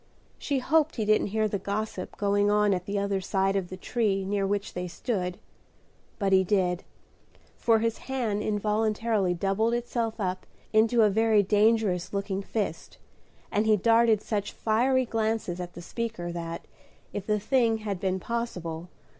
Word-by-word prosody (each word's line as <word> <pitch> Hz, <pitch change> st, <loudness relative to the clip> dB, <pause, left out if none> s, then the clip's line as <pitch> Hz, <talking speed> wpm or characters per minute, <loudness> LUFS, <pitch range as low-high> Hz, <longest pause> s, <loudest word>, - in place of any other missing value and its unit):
She 285 Hz, -, -1 dB
hoped 310 Hz, +4 st, +2 dB
he 220 Hz, -, -1 dB
didn't 215 Hz, 0 st, +3 dB
hear 215 Hz, +1 st, +1 dB
the 200 Hz, -1 st, -2 dB
gossip 200 Hz, 0 st, -4 dB
going 205 Hz, 0 st, +2 dB
on 210 Hz, -1 st, +3 dB
at 180 Hz, -1 st, -2 dB
the 200 Hz, 0 st, -1 dB
other 200 Hz, -1 st, 0 dB
side 195 Hz, +1 st, 0 dB
of 190 Hz, -3 st, -1 dB
the 185 Hz, -, -7 dB
tree 195 Hz, -2 st, 0 dB
near 200 Hz, 0 st, 0 dB
which 200 Hz, 0 st, -2 dB
they 180 Hz, 0 st, -3 dB
stood; 180 Hz, -2 st, -3 dB, 0.8 s
but 195 Hz, -2 st, +1 dB
he 190 Hz, 0 st, +6 dB
did, 180 Hz, -2 st, +1 dB, 0.7 s
for 230 Hz, -1 st, +3 dB
his 225 Hz, 0 st, -1 dB
hand 230 Hz, -6 st, -1 dB
involuntarily 215 Hz, -2 st, 0 dB
doubled 200 Hz, +6 st, +1 dB
itself 235 Hz, -2 st, -2 dB
up 185 Hz, -2 st, -3 dB, 0.3 s
into 225 Hz, +1 st, +4 dB
a 210 Hz, -, +5 dB
very 220 Hz, 0 st, +4 dB
dangerous 210 Hz, -3 st, +2 dB
looking 195 Hz, -1 st, -2 dB
fist, 210 Hz, +1 st, -4 dB, 0.5 s
and 210 Hz, +2 st, +1 dB
he 215 Hz, -1 st, +5 dB
darted 225 Hz, +1 st, +4 dB
such 205 Hz, -2 st, -2 dB
fiery 255 Hz, +4 st, +2 dB
glances 220 Hz, -5 st, -1 dB
at 175 Hz, -1 st, -6 dB
the 175 Hz, -, -9 dB
speaker, 220 Hz, -5 st, -4 dB
that, 170 Hz, -1 st, -5 dB, 0.5 s
if 200 Hz, -1 st, -5 dB
the 210 Hz, -1 st, +2 dB
thing 230 Hz, 0 st, +2 dB
had 205 Hz, -4 st, -4 dB
been 190 Hz, 0 st, -1 dB
possible. 180 Hz, -8 st, -4 dB
205 Hz, 165 wpm, -27 LUFS, 190-225 Hz, 0.8 s, he